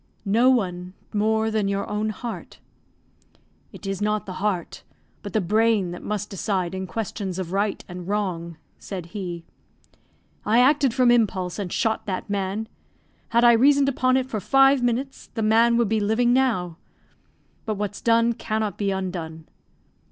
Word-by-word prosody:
"No 230 +6 +4
one 185 -7 -1 0.2
more 220 +1 +1
than 215 -2 0
your 200 0 -1
own 210 +1 -1
heart." 230 +2 -7 1.1
"It - - -12
is 195 0 -3
not 210 0 0
the 185 - -6
heart, 195 -5 -2 0.4
but 205 -3 -8
the 220 - +3
brain, 210 0 +2
that 175 - -7
must 210 0 -4
decide 190 -2 -2
in 190 0 -4
questions 200 -3 -4
of 180 -2 -4
right 200 +1 -1
and 180 -1 -8
wrong," 180 -5 -2 0.2
said 185 -4 -6
he. 175 -4 -5 1.0
"I 220 +2 +2
acted 275 +1 +4
from 250 -2 +4
impulse, 195 -6 +1
and 190 -4 -4
shot 220 0 -1
that 190 +1 -4
man; 200 +2 -2 0.6
had 235 +1 +3
I 240 - +8
reasoned 275 +4 +4
upon 255 -1 +2
it 260 - 0
for 220 -4 -3
five 270 +6 +4
minutes, 245 +3 -2
the 225 - -1
man 230 +2 +4
would 235 -2 +2
be 220 +1 +1
living 220 +4 +2
now. 220 -11 +1 0.9
But 215 - -1
what's 205 0 -4
done 230 0 +3
cannot 215 -4 -3
be 200 -1 0
undone. 175 -4 -4
210 Hz, 160 wpm, -24 LUFS, 190-230 Hz, 1.1 s, I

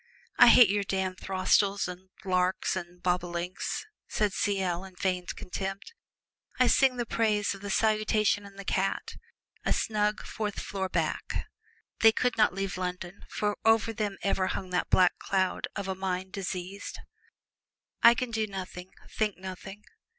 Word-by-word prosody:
"I - - +10
hate 240 -6 +8
your 205 0 +1
damned 190 -1 -2
throstles 195 +1 +2
and 180 +1 -9 0.2
larks 185 0 +1
and 175 -1 -7
bobolinks," 180 - -2 0.2
said 210 -2 0
C.L., 190 -4 0
in 190 -1 -12
feigned 180 -1 -2
contempt. 195 - -5 0.7
"I - - +6
sing 265 -2 +4
the 240 - -1
praises 215 -3 +1
of 195 - -11
the 200 - -5
'Salutation 215 0 +2
and 200 -1 -13
the 200 - -8
Cat' 195 +1 -1 0.5
and - - 0
a - - +3
snug 210 -1 0
fourth 210 -2 -4
floor 190 -1 -3
back." - - -2 0.5
They 225 - +7
could 250 +2 0
not 215 - +4
leave 195 -1 -3
London, 180 0 -5
for 205 -1 -1
over 225 0 +3
them 210 -3 -2
ever 195 -1 +1
hung 185 -1 -4
that 180 - 0
black 180 -1 +4
cloud 190 -1 0
of 200 -2 -4
a 190 - -1
mind 190 0 -3
diseased. 190 0 -5 1.0
"I 235 +1 +8
can 250 0 -3
do 220 -1 0
nothing 185 -2 -7
think 215 -2 -1
nothing. 190 +2 -8
195 Hz, 160 wpm, -29 LUFS, 185-210 Hz, 1.0 s, I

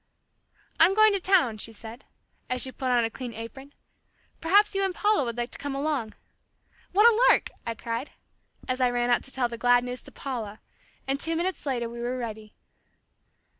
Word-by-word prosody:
"I'm 350 +4 +6
going 435 -1 +6
to 395 - +1
town," 350 - +2
she 225 - -4
said, 225 +3 -11 0.4
as 255 -1 +1
she 260 - -2
put 260 0 -4
on 245 -1 +3
a 225 - -1
clean 245 -2 -7
apron. 265 +5 -9 0.7
"Perhaps 405 +6 +4
you 390 0 0
and 380 -2 -1
Paula 420 -7 +2
would 235 -1 -4
like 240 0 -3
to - - -8
come 285 -1 -4
along." 275 -6 -2 0.8
"What 420 +5 +6
a 470 0 +4
lark!" - - +3 0.2
I 230 - -2
cried, 230 +4 -4 0.6
as 255 0 -1
I 250 - +4
ran 245 0 0
out 240 - +2
to 270 - -5
tell 260 -2 +1
the 235 -1 -8
glad 245 0 +4
news 250 0 -3
to - - -7
Paula, 225 -6 -6 0.5
and 270 +1 0
two 325 +2 0
minutes 350 -2 -2
later 240 -3 -1
we 235 +1 -8
were 245 +2 -2
ready. 220 -3 -7
255 Hz, 200 wpm, -26 LUFS, 235-325 Hz, 0.8 s, I'm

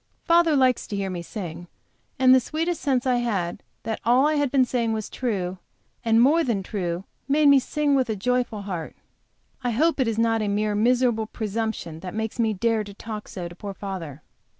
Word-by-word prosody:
Father 335 -2 +4
likes 255 -3 +2
to 205 - -4
hear 195 -1 -2
me 175 -1 -4
sing, 175 -2 -7 0.5
and 260 -1 +6
the 260 - +7
sweet 325 +7 -2
sense 265 -5 0
I 250 -1 +2
had 200 -8 -2 0.2
that 225 -1 -3
all 250 +4 +4
I 305 - +3
had 290 -2 +1
been 265 -1 +3
saying 235 -3 0
was 215 -1 -4
true 190 -7 -2 0.4
and 225 -1 +3
more 300 +7 +5
than 220 -8 -1
true, 180 -3 -3 0.2
made 290 +1 +4
me 280 -1 +7
sing 295 +2 0
with 250 -6 +1
joyful 245 -2 0
heart. 180 -5 -5 0.7
I 245 - +1
hope 300 +8 +2
it 260 - +2
is 225 -1 -1
not 225 -1 +2
a 210 - -1
mere 210 +1 0
miserable 235 0 +2
presumption 220 -7 -4
that 180 +2 -7
makes 220 +1 -3
me 225 -2 +2
dare 220 +2 0
to 200 -1 -11
talk 215 0 -7
so 180 -6 -6
to 170 - -10
poor 200 +1 -7
father. 170 -8 -6
225 Hz, 200 wpm, -24 LUFS, 200-255 Hz, 0.7 s, the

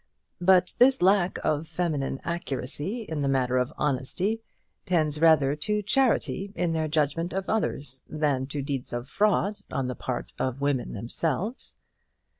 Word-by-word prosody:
But 180 0 +4
this 255 -5 +5
lack 190 -1 +4
of 155 +1 0
feminine 155 -5 -2
accuracy 170 - -3
in 160 -7 -4
the 140 - +1
matter 130 -2 +2
of 125 0 -1
honesty 150 - -1 0.4
tends 155 -5 +1
rather 150 -4 +5
to 210 +7 -1
charity 215 -4 +1
in 170 -1 0
their 160 -1 0
judgment 155 +3 0
of 195 0 -2
others, 140 - -2
than 145 -4 0
to 145 0 -4
deeds 135 -3 -4
of 120 +2 -3
fraud 205 +4 +1
on 135 - -1
the 125 - -2
part 125 -2 -4
of 130 0 -1
women 140 -3 0
themselves. 165 - -3
155 Hz, 150 wpm, -27 LUFS, 135-185 Hz, 0.4 s, this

